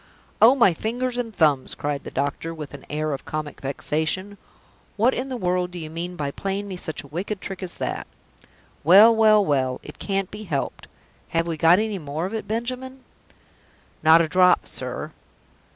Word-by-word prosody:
"Oh, 240 +4 +8
my 235 -9 +5
fingers 245 +7 -2
and 235 -2 -3
thumbs!" 150 -9 +2
cried 145 -1 -3
the - - -5
doctor, 145 +4 -3
with 150 -3 -8
an 140 - -11
air 155 +1 -2
of 135 - -5
comic 155 -1 -5
vexation, 160 +8 -2 0.6
"what 235 +5 +3
in 260 +2 -3
the 255 - -3
world 180 -3 0
do 180 - -9
you 155 -2 -7
mean 175 +2 -5
by 145 -4 -3
playing 195 +5 -3
me 190 - -5
such 160 -4 -4
a - - -13
wicked 185 +7 -4
trick 195 -1 -7
as 185 -2 -4
that? - - -3 0.8
Well, 205 +8 +8
well, 215 -2 +5
well 130 -3 0
it - - -11
can't 195 -2 -2
be 210 - -8
helped. 155 -10 -4 0.4
Have 165 0 0
we 170 -1 -2
got 165 +3 +5
any 215 -2 -1
more 155 +2 -4
of 195 - -5
it, 220 -2 -4
Benjamin?" 255 +4 -4 1.0
"Not 160 +1 +7
a - - -1
drop, 180 +1 +4
sir." - - -3
180 Hz, 185 wpm, -23 LUFS, 155-215 Hz, 1.0 s, Oh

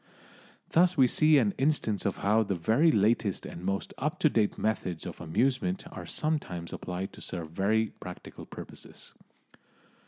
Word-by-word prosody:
Thus 180 +1 +4
we 130 - +7
see 155 +4 +5
an 110 -7 +3
instance 130 -9 +1
of 100 - -2
how 110 +2 +4
the 100 -3 -1
very 115 - +3
latest 105 -1 +1
and 85 - -8
most 100 +1 -2
up 150 +6 -1
to 155 - +5
date 110 -3 +1
methods 95 -6 -2
of - - -7
amusement 130 - 0
are - - -8
sometimes 95 - -2
applied 90 +1 -5
to - - -11
serve 85 -3 -4
very 110 +5 +1
practical - - -9
purposes. - - -10
110 Hz, 155 wpm, -29 LUFS, 95-145 Hz, -, we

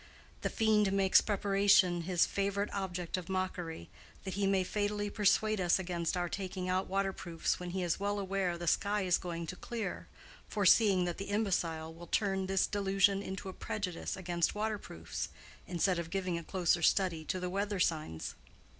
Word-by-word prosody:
The - - 0
fiend 215 -3 +3
makes 195 -1 +5
preparation 195 -3 +3
his 175 -2 +4
favorite 200 +1 -1
object 180 -3 -3
of 180 -1 -7
mockery, 185 -3 -3 0.4
that 190 - -4
he 200 +1 0
may 195 -1 +3
fatally 205 +1 -1
persuade 215 0 +2
us 175 -1 +4
against 175 -2 -2
our 175 0 0
taking 185 0 -4
out 185 +1 0
waterproofs 190 -3 -1
when 180 0 -5
he 185 +1 -2
is 175 0 0
well 205 +1 -1
aware 190 -3 -1
the 175 - -5
sky 205 +4 +1
is 180 -2 +2
going 170 -1 -4
to 175 - -6
clear, 225 +1 -5 0.4
foreseeing 200 -2 +4
that 175 -1 -3
the 195 - -3
imbecile 175 -6 -1
will 170 +1 -11
turn 195 -3 0
this 195 0 +2
delusion 195 -1 +2
into 190 0 -6
a 190 - -5
prejudice 185 -3 -4
against 175 -1 0
waterproofs 210 - -4 0.4
instead 180 0 +1
of 170 -1 -4
giving 185 -1 -1
a 170 - -4
closer 175 -1 +1
study 170 -1 +2
to 185 - -2
the 180 0 -3
weather 200 +1 -1
signs. 155 - -1
190 Hz, 170 wpm, -33 LUFS, 175-200 Hz, 0.4 s, makes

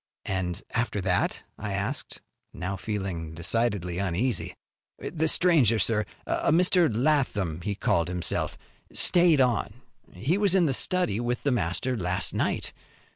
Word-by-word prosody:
"And 95 -1 -3
after 115 -2 -1
that?" 90 -1 0 0.2
I 105 -2 -4
asked, 105 +8 -4 0.3
now 90 +3 -4
feeling 95 -6 -4
decidedly 90 -1 0
uneasy. 100 +4 -1 0.4
"The 160 -1 -2
stranger, 155 - +4
sir 105 0 +2 0.2
a - - 0
Mr. 175 0 +4
Lathom 110 - 0
he 100 +3 -3
called 85 -4 +1
himself 90 -1 -2 0.3
stayed 175 -5 +4
on. 125 -2 0 0.3
He 140 - 0
was 200 -3 +3
in 180 -3 +4
the 140 - +1
study 130 - 0
with 120 +1 -2
the 140 - +1
master 120 +4 -1
last 90 -3 -1
night. - - -1
110 Hz, 135 wpm, -27 LUFS, 90-135 Hz, 0.4 s, stranger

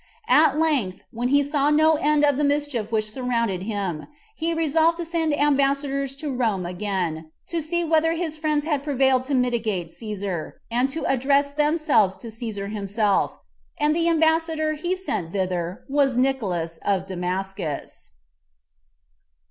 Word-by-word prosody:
At 300 -1 +5
length, 280 - 0
when 240 +2 -2
he 285 +2 +4
saw 285 0 +1
no 310 +1 +5
end 295 0 +3
of 285 -2 +3
the 295 - +1
mischief 285 -6 0
which 215 -1 0
surrounded 230 -6 -1
him, 195 -6 -3 0.3
he 330 -2 -1
resolved 325 +1 +2
to 345 - -4
send 325 -3 0
ambassadors 275 -1 +1
to 290 -1 -4
Rome 220 -7 0
again, 175 -4 -3 0.2
to 335 -1 -1
see 345 +3 -1
whether 325 0 +2
his 330 -2 -2
friends 305 -1 0
had 295 -4 -1
prevailed 265 -3 +2
to 275 +1 0
mitigate 225 -8 0
Cæsar, 200 -4 -5 0.2
and 245 +3 +2
to 320 +4 -4
address 280 +2 +2
themselves 295 - +2
to 230 - -9
Cæsar 215 -3 -5
himself; 205 0 0 0.4
and 300 +1 +2
the 335 0 +2
ambassador 320 -1 +2
he 350 +4 -2
sent 185 - -4
thither 185 +1 -2
was 275 -3 +2
Nicolans 190 -11 0
of 195 -2 0
Damascus. 185 - -4
270 Hz, 150 wpm, -24 LUFS, 200-305 Hz, 0.4 s, At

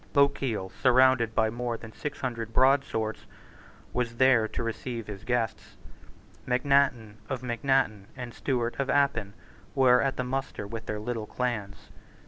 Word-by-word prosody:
Lochiel, 135 -9 +2
surrounded 130 -3 +4
by 110 -1 +3
more 120 0 -3
than 110 -1 -11
six 150 - -6
hundred 115 -3 -3
broadswords, 130 -4 +2 0.7
was 120 -1 -1
there 125 -3 +4
to - - -4
receive 115 0 -4
his 105 -1 -8
guests. 115 -2 -2 0.7
Macnaghten 125 -4 +2
of 130 -2 -3
Macnaghten 120 -5 0
and 125 -2 -6
Stewart 120 -3 -2
of 140 -1 -1
Appin 125 -7 +1 0.4
were 125 -2 +5
at 135 -1 0
the 125 - 0
muster 130 -4 -3
with 115 +2 -7
their 105 0 -3
little 110 -1 -4
clans. 110 -5 -4
120 Hz, 140 wpm, -28 LUFS, 110-130 Hz, 0.7 s, were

